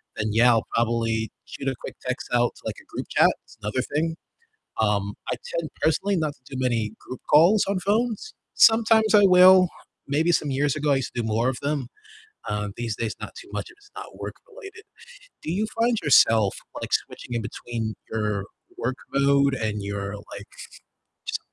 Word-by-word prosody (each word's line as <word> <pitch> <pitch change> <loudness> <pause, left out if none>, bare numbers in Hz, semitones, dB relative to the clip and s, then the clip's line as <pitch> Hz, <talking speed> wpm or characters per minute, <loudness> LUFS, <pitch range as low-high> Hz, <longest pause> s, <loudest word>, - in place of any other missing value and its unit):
Then, 110 0 -2
yeah, 120 +3 +5
I'll 115 - +1
probably 115 -1 0 0.2
shoot 135 - -7
a 130 - 0
quick - - -7
text 130 +1 -4
out 120 0 +3
to, - - -17
like, - - -4
a - - -23
group - - -6
chat, - - +5
that's - - -19
another 115 +5 -1
thing, 160 +2 0 0.7
um, 100 -2 +1 0.2
I - - -1 0.2
tend 160 -2 -3
personally 195 +6 +1
not 155 -3 -1
to 130 0 -14
do 130 - -3
many 115 -4 0
group 130 - -9
calls 175 +8 +6
on 200 -2 0
phones, 225 - -1 0.2
sometimes 225 -1 +5
I 205 - +8
will, 185 0 +7 0.4
maybe 155 +5 +1
some 150 -3 +1
years 140 +2 0
ago 150 -1 +1
I - - +3
used 135 - -3
to 120 - -1
do 110 - -4
more 115 +3 +1
of 130 - -2
them. 140 -4 -2 0.6
Um, 105 -1 -2
these 115 -3 -3
days 115 -2 -3
not - - -8
too - - -11
much - - -3
if 350 - -16
it's 410 0 -22
not - - -9
work-related. 405 +1 -10 0.6
Do 160 - -4
you 205 +5 0
find 235 0 +3
yourself, 115 -8 +5 0.3
like, - - -5
switching 120 - -3
in 115 - -1
between 115 -1 -5 0.2
your 105 -3 -1 0.3
work 130 +3 -2 0.2
mode 140 0 +3
and 105 -3 -2
your, 100 0 -4
like, 100 0 -10 0.8
just - - -2
130 Hz, 190 wpm, -24 LUFS, 110-170 Hz, 0.8 s, I